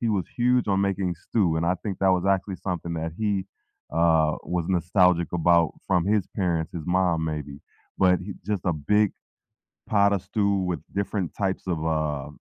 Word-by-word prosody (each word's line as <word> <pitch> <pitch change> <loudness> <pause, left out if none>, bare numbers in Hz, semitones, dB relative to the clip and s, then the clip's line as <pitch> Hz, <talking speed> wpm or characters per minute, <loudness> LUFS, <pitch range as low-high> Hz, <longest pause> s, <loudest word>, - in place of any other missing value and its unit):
he 115 - 0
was 100 -5 0
huge 125 -2 +2
on 95 0 +2
making 95 -2 0
stew, 85 -1 0
and 85 +1 0
I 90 - +2
think 100 -4 -4
that 95 -1 +4
was 90 0 0
actually 95 0 +1
something 85 -2 -4
that 80 0 -3
he, 100 -3 0 0.5
uh, 80 -2 +3
was 85 -2 -2
nostalgic 90 -1 +2
about 85 -1 +3
from 90 -3 +2
his 105 -2 +1
parents, 85 -5 -1
his 85 -3 -5
mom 90 -3 +1
maybe, 75 -3 -4 0.4
but 90 -1 +4
he 95 +1 -7
just 105 -4 -1
a 90 - +3
big 100 +8 +2 0.8
pot 100 -1 +4
of 95 - 0
stew 100 0 0
with 85 -4 -2 0.2
different 100 -3 -2
types 95 -2 -1
of, 85 -3 -1
uh, 75 -3 -1
90 Hz, 185 wpm, -25 LUFS, 85-100 Hz, 0.8 s, that